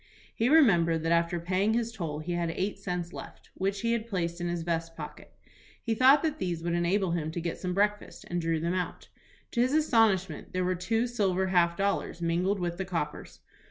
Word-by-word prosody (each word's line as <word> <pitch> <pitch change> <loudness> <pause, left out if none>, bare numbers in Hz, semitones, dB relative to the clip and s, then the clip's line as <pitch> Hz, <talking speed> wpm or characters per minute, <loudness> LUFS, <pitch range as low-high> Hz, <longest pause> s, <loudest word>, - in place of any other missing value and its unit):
He 230 +2 +1
remembered 170 - +4
that 165 - 0
after 170 +1 +2
paying 190 +5 +1
his 230 -1 0
toll 165 -8 -4
he 170 +3 -5
had 175 -1 -1
eight 195 +1 -2
cents 180 -3 -4
left, - - -10
which 195 +1 -2
he 230 - +1
had 230 -1 -2
placed 175 -4 -2
in 175 - -1
his 175 -1 -2
vest 165 -1 -2
pocket. - - -9 0.5
He 230 - 0
thought 265 +5 +6
that 310 -1 -1
these 170 -3 -2
would 170 0 -1
enable 175 +2 +1
him 165 -2 -1
to 160 - -4
get 170 0 -4
some 180 -1 -3
breakfast, 205 +1 -1
and 175 0 -2
drew 165 -1 0
them 170 +2 -1
out. 180 -2 -4 0.4
To 235 - +1
his 255 +4 +2
astonishment 225 - +2
there 185 0 0
were 185 - +1
two 225 +7 0
silver 195 -6 0
half 170 -2 +3
dollars 200 -3 -1
mingled 175 +4 +1
with 175 -1 -2
the 190 - -1
coppers. 165 -5 -4
180 Hz, 210 wpm, -29 LUFS, 170-210 Hz, 0.5 s, thought